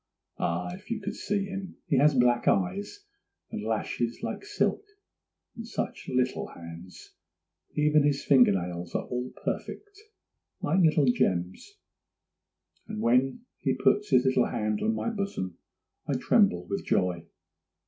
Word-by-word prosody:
Ah, 85 - -1
if 190 +4 -12
you 230 -2 -2
could 205 0 -4
see 205 -1 -1
him! 195 -1 -6
he 140 - +1
has 145 +1 +5
black 120 -1 +3
eyes 200 - 0 0.5
and - - -4
lashes - - -2
like - - -4
silk, 415 0 0 0.7
and 230 0 -7
such 230 - -4
little 130 0 0
hands!—even 90 - -3
his 145 -1 +1
finger 130 -6 +6
nails 90 -2 -3
are - - -1
all 125 +1 -3 0.2
perfect, 410 0 -5 0.6
like 170 +6 +1
little 155 -4 +4
gems; 90 -7 0 1.1
and - - -5
when 125 - +2 0.2
he - - 0
puts 210 0 +2
his 130 -1 +4
little 130 -2 +3
hand 105 -1 -1
on 225 +1 +1
my 230 - -2
bosom 195 - -4 0.5
I - - 0
tremble 90 0 +3
with 100 +2 -3
joy. 90 -2 0
130 Hz, 140 wpm, -28 LUFS, -, 1.1 s, finger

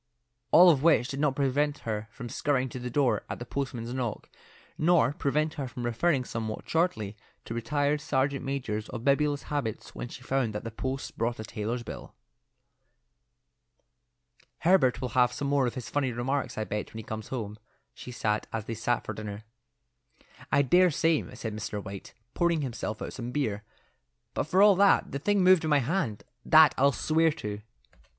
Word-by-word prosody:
All 175 +1 +8
of 140 -5 +1
which 150 -5 +4
did 135 - -4
not 145 -2 +1
prevent 145 +2 +1
her 110 -1 -3
from 120 +2 -8
scurrying 130 +1 0
to 125 - -7
the 125 0 -4
door 135 0 +2
at - - -4
the 120 - -7
postman's 125 -2 -4
knock, 125 -4 -4 0.4
nor 155 -5 +3
prevent 150 +3 0
her 135 - -3
from 120 -1 -6
referring 130 +3 +1
somewhat 110 -2 -5
shortly 160 - 0 0.3
to - - -5
retired 145 +6 0
sergeant 140 -1 0
majors 125 -6 -3
of 120 -2 -6
bibulous 145 +1 +2
habits 140 -8 -4
when - - -5
she - - -11
found 130 -5 -1
that 105 - -4
the 115 - -5
post 130 +4 -5
brought 115 +1 -1
a - - -4
tailor's 115 +2 -4
bill. - - -9 2.5
"Herbert 155 -9 +4
will 130 - -2
have 125 0 +3
some 140 - -3
more 140 -2 +2
of 120 - -4
his 125 -3 -6
funny 140 -3 0
remarks, 130 +4 -2
I - - -1
expect, 105 0 -4
when - - -5
he 110 - -6
comes 110 0 -6
home," 110 -4 -5 0.3
she 125 - -9
said, 105 -3 -1
as 110 -2 -3
they 115 - -4
sat 115 +2 -1
at - - -4
dinner. 105 0 -6 1.1
"I 140 - +4
dare 180 +7 +5
say," 160 0 +2
said 110 -3 -5
Mr. 110 -1 -4
White, 100 -1 -9 0.2
pouring 170 -2 +1
himself 115 -5 -4
out - - -6
some 120 -1 -5
beer; 120 -7 -1 0.7
"but - - -1
for 185 +4 +4
all 205 -2 +7
that, 200 0 +4
the 140 - -3
thing 200 +4 +2
moved 185 -2 +6
in 160 - -1
my 150 - +5
hand; 135 - -1 0.2
that 155 -3 +7
I'll 140 +1 +4
swear 160 +4 +2
to." 105 -4 -6
130 Hz, 185 wpm, -28 LUFS, 115-145 Hz, 2.5 s, All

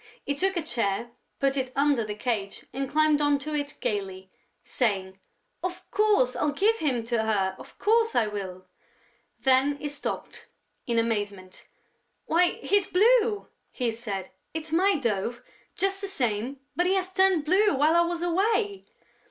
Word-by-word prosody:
He 285 - 0
took 380 +6 0
a 335 - 0
chair, 235 -3 -1 0.3
put 275 0 +2
it 260 -2 -2
under 280 -3 +3
the 210 -1 -5
cage 210 -3 -3
and 270 -1 -3
climbed 305 0 +3
on 290 -1 +3
to 300 +2 -6
it 290 -1 -3
gaily, 190 -2 -3 0.3
saying: 190 -6 -1 0.4
"Of 365 0 -4
course, 415 -13 +3
I'll 295 -1 0
give 430 +9 +2
him 265 - 0
to 230 0 0
her, 195 -4 0
of - - -13
course, 455 +1 +2
I 230 - +4
will!..." 190 -3 -6 0.8
Then 270 +2 +3
he 295 - -4
stopped, 290 0 -5 0.4
in 235 -1 0
amazement: 205 -5 -2 0.6
"Why, 350 +2 +3
he's 400 -1 +2
blue!" 435 +1 +3 0.2
he 245 -3 -1
said. 205 -5 -5 0.2
"It's 320 0 -5
my 385 +4 +4
dove, 235 - -2 0.3
just 390 0 0
the 400 - -3
same, 250 - -2 0.2
but 355 +1 +2
he 380 - +3
has 375 -1 -1
turned 375 -5 +3
blue 390 +6 +3
while 300 +4 +3
I 340 - +6
was 340 0 -1
away!" 400 +3 0
285 Hz, 160 wpm, -27 LUFS, 225-365 Hz, 0.8 s, I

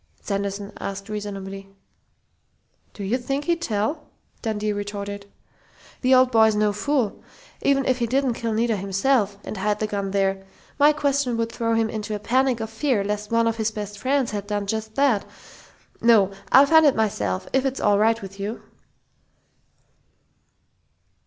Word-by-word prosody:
Sanderson 200 0 -4
asked 195 +1 -6
reasonably. 195 -2 -6 1.3
"Do 205 - -6
you 225 +7 0
think 275 +3 -3
he'd 340 +1 0
tell?" 235 +4 -2 0.3
Dundee 215 -2 -1
retorted. 205 0 -6 0.7
"The 260 0 +5
old 255 0 +5
boy's 220 -2 +5
no 210 0 +2
fool. 240 0 -1 0.4
Even 275 -1 +2
if 255 -1 +1
he 235 - 0
didn't 265 +1 +1
kill 230 0 -3
Nita 225 +1 +1
himself 200 +2 +1
and 215 - -6
hide 205 +2 0
the 215 - -1
gun 200 -2 -3
there, 195 0 0 0.4
my 295 +1 +7
question 280 -4 0
would 230 0 -1
throw 230 -1 -1
him 225 0 +2
into 215 -1 -4
a - - -4
panic 255 +3 +1
of 220 0 -5
fear 235 -3 0
lest 210 +1 -3
one 230 0 +2
of 230 0 0
his 220 -1 0
best 210 -2 -7
friends 270 -1 0
had 205 -1 -4
done 205 -1 -2
just 220 +1 -4
that.... 275 -7 +3 0.8
No, 220 -5 +5 0.2
I'll 270 +2 +8
find 320 +2 +6
it 285 -3 +5
myself, 105 - -1
if 265 0 +3
it's 270 0 -2
all 205 -1 +3
right 225 +1 +3
with 195 +1 -10
you!" 210 +4 -5
220 Hz, 165 wpm, -23 LUFS, 205-255 Hz, 1.3 s, I'll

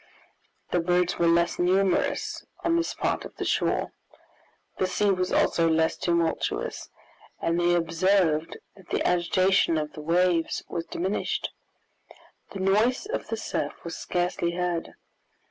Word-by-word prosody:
The 175 - +2
birds 180 +1 +1
were 170 - +3
less 170 +1 +2
numerous 185 +2 +1 0.2
on 335 0 +2
this 335 0 0
part - - -1
of - - -10
the - - -4
shore; - - 0 0.9
the 185 - +2
sea 205 +2 +2
was 185 -1 0
also 165 -1 +3
less 160 0 +2
tumultuous, 170 -1 -1 0.5
and 165 +1 0
they 175 0 +3
observed 165 -1 +1 0.2
that 190 -3 -18
the - - 0
agitation 180 0 +3
of 150 -1 -3
the 155 - -8
waves 170 +1 +1
was 165 -1 -4
diminished. 190 +4 -2 1.0
The 195 - -6
noise 215 - +2
of 435 - -4
the - - -3
surf - - -3
was - - -5
scarcely 175 -1 -1
heard. 175 -1 -2
175 Hz, 140 wpm, -26 LUFS, 170-190 Hz, 1.0 s, were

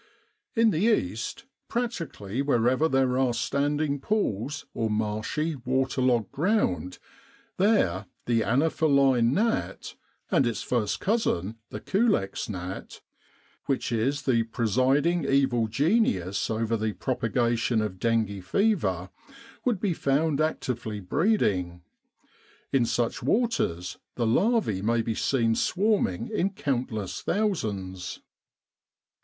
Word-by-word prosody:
In 225 -1 +4
the 155 - -1
East, 120 - 0 0.2
practically 165 - -3
wherever 130 +2 +2
there 130 -2 +2
are 125 -3 +2
standing 145 +3 0
pools, 140 - -1
or 115 -1 -1
marshy, 110 +9 -1
waterlogged 130 -3 +1
ground, 135 - 0 0.6
there 145 - +2 0.2
the 115 -2 +2
anopheline 135 -2 +3
gnat, 225 - -1 0.4
and 135 - +3
its 115 - -2
first 115 -5 -1
cousin 115 - 0
the - - -6
culex 200 - 0
gnat, 95 -1 -6 0.7
which 135 -3 -1
is 135 +5 0
the 120 -4 +3
presiding 130 - +1
evil 135 -5 +2
genius 110 - +1
over 115 0 0
the 110 -1 -1
propagation 120 -1 0
of 105 -4 -3
dengue 110 -4 0
fever, 95 - 0 0.5
would 240 -6 +1
be 195 -3 0
found 150 +1 +1
actively 120 -8 -2
breeding. 95 - 0 0.9
In 130 -3 +3
such 120 0 -1
waters 120 - 0 0.2
the 120 - 0
larvae 185 - +2
may 115 +2 +1
be 115 - -1
seen 115 0 +1
swarming 215 - +1
in 195 -2 +1
countless 125 - -2
thousands. 100 - -2
125 Hz, 110 wpm, -27 LUFS, 110-160 Hz, 0.9 s, In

